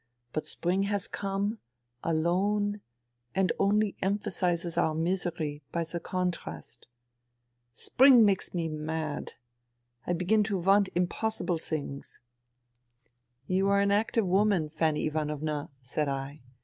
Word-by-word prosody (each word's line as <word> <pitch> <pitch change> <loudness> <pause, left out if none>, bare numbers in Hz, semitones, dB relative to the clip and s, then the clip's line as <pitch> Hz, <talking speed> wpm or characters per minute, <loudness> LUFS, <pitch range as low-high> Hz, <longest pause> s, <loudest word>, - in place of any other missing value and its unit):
But 155 - -2
spring 190 +3 0
has 205 -2 0
come... 200 +2 -2 0.4
alone, 200 +6 +1 0.5
and 190 -1 +2
only 205 +1 +2
emphasizes 180 -3 -1
our 155 - +2
misery, 165 -3 -1
by 170 - 0
the 165 +1 -4
contrast.... 180 -10 -4 0.8
Spring 245 - +6
makes 195 -2 +1
me 170 -2 -1
mad. 155 -1 -4 0.7
I 175 - +1
begin 180 +5 +2
to 200 -1 -1
want 195 +2 +4
impossible 180 0 0
things. 145 -4 -5 0.4
..." 120 0 -46 0.2
" 120 +1 -48
You 190 +3 +1
are 200 0 +4
an 200 0 +3
active 215 +1 +2
woman, 190 -3 +2
Fanny 155 -1 0
Ivanovna, 150 -1 -2
"^ - - -25
said 150 +4 -1
I. 135 +1 -4
175 Hz, 125 wpm, -29 LUFS, 155-200 Hz, 0.8 s, Spring